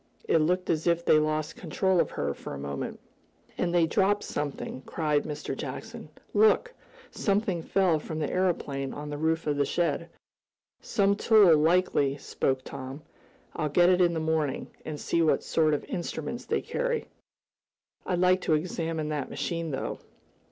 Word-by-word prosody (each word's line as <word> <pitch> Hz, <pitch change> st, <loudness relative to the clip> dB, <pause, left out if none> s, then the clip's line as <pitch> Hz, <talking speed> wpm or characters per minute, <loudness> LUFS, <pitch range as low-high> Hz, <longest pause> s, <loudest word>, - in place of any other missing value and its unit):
"It 165 Hz, -, +4 dB
looked 180 Hz, +4 st, +1 dB
as 160 Hz, 0 st, -1 dB
if 170 Hz, 0 st, +2 dB
they 155 Hz, -, +6 dB
lost 155 Hz, +1 st, -1 dB
control 185 Hz, +2 st, 0 dB
of -, -, +2 dB
her 70 Hz, 0 st, -2 dB
for -, -, -8 dB
a -, -, -6 dB
moment." 70 Hz, 0 st, -5 dB, 0.6 s
"And 175 Hz, -, -1 dB
they 175 Hz, -1 st, +4 dB
dropped 200 Hz, +4 st, +2 dB
something!" 145 Hz, -3 st, -4 dB
cried 150 Hz, -3 st, 0 dB
Mr. 150 Hz, -2 st, -4 dB
Jackson. 220 Hz, -, -7 dB, 0.2 s
"Look! 220 Hz, -, +4 dB, 0.4 s
something 195 Hz, -4 st, 0 dB
fell 180 Hz, -2 st, +2 dB
from 155 Hz, +1 st, -6 dB
the 155 Hz, -2 st, -1 dB
aeroplane 145 Hz, -7 st, -1 dB
on 150 Hz, 0 st, -6 dB
the 145 Hz, -, -4 dB
roof 160 Hz, +1 st, 0 dB
of 150 Hz, -1 st, 0 dB
the 145 Hz, -, +3 dB
shed." 170 Hz, -1 st, -1 dB, 0.7 s
"Some 200 Hz, -1 st, +2 dB
tool, 205 Hz, -5 st, +6 dB
likely," 155 Hz, -3 st, +2 dB
spoke 130 Hz, -2 st, -1 dB
Tom. 135 Hz, +4 st, -8 dB, 0.5 s
"I'll 150 Hz, -, -1 dB
get 175 Hz, +5 st, +5 dB
it 185 Hz, 0 st, +4 dB
in 170 Hz, -1 st, +3 dB
the -, -, 0 dB
morning, 160 Hz, -3 st, -1 dB
and 150 Hz, -2 st, -5 dB
see 170 Hz, -, 0 dB
what 160 Hz, -, +2 dB
sort 155 Hz, -2 st, +2 dB
of -, -, -5 dB
instruments 175 Hz, -2 st, -4 dB
they -, -, 0 dB
carry. -, -, -2 dB, 1.0 s
I'd 180 Hz, -, -1 dB
like 185 Hz, +1 st, +3 dB
to 160 Hz, -, +2 dB
examine 160 Hz, -1 st, -2 dB
that 150 Hz, -3 st, -3 dB
machine, 165 Hz, -1 st, -3 dB
though." 135 Hz, -, -3 dB
160 Hz, 165 wpm, -28 LUFS, 150-180 Hz, 1.0 s, they